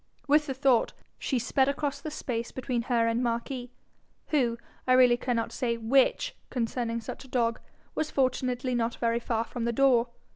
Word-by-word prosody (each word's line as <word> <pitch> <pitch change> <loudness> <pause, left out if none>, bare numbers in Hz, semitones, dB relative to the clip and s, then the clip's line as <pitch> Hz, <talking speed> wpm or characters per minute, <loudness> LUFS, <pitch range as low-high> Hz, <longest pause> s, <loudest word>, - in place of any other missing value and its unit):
With 295 +1 +4
the 270 - -3
thought, 260 -3 +3 0.3
she 265 - 0
sped 265 +3 +2
across 280 0 -2
the 310 - -4
space 235 -6 -4
between 250 -2 -2
her 235 -1 +1
and 230 +1 +1
Marquis, 245 +1 -2 0.6
who 245 -6 +2 0.3
I 255 - +5
really 250 -1 +6
cannot 240 -2 -1
say 235 -2 -1
WHICH 265 - +2
concerning 230 -1 -2
such - - -7
a - - -14
dog 235 -3 0 0.3
was 310 - -1
fortunately 255 -1 0
not 235 -1 0
very 230 0 0
far 230 -1 -1
from 235 0 -5
the 235 - +1
door. 245 -1 +4
245 Hz, 175 wpm, -28 LUFS, 235-265 Hz, 0.6 s, really